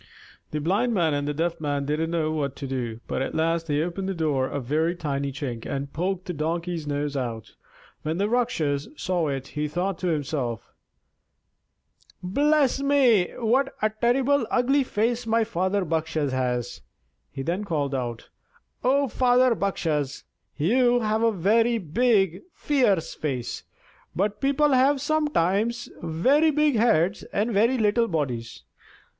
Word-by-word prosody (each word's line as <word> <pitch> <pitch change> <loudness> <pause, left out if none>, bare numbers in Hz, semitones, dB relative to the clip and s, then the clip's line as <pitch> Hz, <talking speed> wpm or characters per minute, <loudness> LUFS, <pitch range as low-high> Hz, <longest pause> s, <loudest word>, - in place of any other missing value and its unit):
The 150 - -3
Blind 200 +10 +1
Man 165 -5 +2
and 145 0 -1
the 150 - -1
Deaf 165 +1 -1
Man 145 -2 -1
didn't 155 +3 -1
know 160 -2 0
what 145 -3 -2
to 140 - -6
do; 120 -4 -4
but - - -3
at 135 - -3
last 165 +1 0
they 150 0 +1
opened 190 +3 -3
the 195 - -2
door 145 -5 0
a 140 - -3
very 155 +7 0
tiny 140 -4 -2
chink 130 -5 -5
and 140 0 -4
poked 185 +2 -2
the 180 - -4
Donkey's 165 +1 -3
nose 145 0 -2
out. 115 -5 -4 0.5
When 155 +2 -2
the 200 +2 +1
Rakshas 190 - 0
saw 175 -3 -1
it 135 -2 -4
he 150 0 -2
thought 175 +4 -2
to 185 - -2
himself: 140 -7 -2 1.5
"Bless 280 +7 +2
me, 260 -9 +4
what 255 +4 +1
a 215 - +3
terribly 250 +5 +2
ugly 270 +3 +2
face 235 0 -1
my 225 0 +3
father 190 -2 -1
Bakshas 160 -3 -1
has!" 125 -2 -2 0.5
He 135 - -5
then 175 +7 -2
called 150 -7 -2
out: 120 -3 -4 0.5
"O 275 +2 +3
father 250 +1 +3
Bakshas, 155 - -2 0.3
you 240 - +3
have 215 0 0
a 230 0 +3
very 225 +5 +2
big, 195 -1 +1
fierce 230 - +1
face; 130 -6 -4 0.5
but 200 +3 -1
people 280 +2 +3
have 270 +2 +4
sometimes 235 - 0
very 260 - +3
big 300 -2 +2
heads 210 -4 +2
and 220 +3 0
very 230 +6 +3
little 225 +1 +2
bodies. 130 - -3
175 Hz, 150 wpm, -25 LUFS, 145-235 Hz, 1.5 s, me